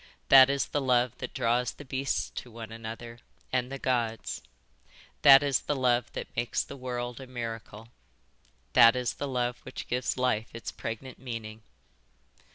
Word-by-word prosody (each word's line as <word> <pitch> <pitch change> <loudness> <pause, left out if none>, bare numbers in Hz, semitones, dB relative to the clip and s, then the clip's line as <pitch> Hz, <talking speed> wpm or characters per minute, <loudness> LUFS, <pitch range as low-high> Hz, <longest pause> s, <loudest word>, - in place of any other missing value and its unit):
That 135 -1 +9
is 140 0 +1
the 145 - -2
love 125 -2 +2
that - - -5
draws 120 +1 +1
the 145 - -12
beasts 135 +1 -2
to 125 - -7
one 115 -1 -9
another, 115 +1 -8 0.3
and 130 0 0
the 135 - -4
Gods. 120 -4 -1 0.8
That 135 0 +9
is 140 -3 +2
the 145 - -2
love 125 -3 +1
that - - -7
makes 120 0 0
the - - -9
world 125 -1 -5
a 130 - -9
miracle. 115 -3 -7 0.8
That 115 +1 +8
is 125 -2 -1
the 145 - -4
love 125 -2 -1
which 130 - -8
gives 125 +1 -1
life 125 -3 +1
its 115 - -5
pregnant 120 +3 -7
meaning. 110 -3 -7
125 Hz, 165 wpm, -29 LUFS, 115-130 Hz, 0.8 s, That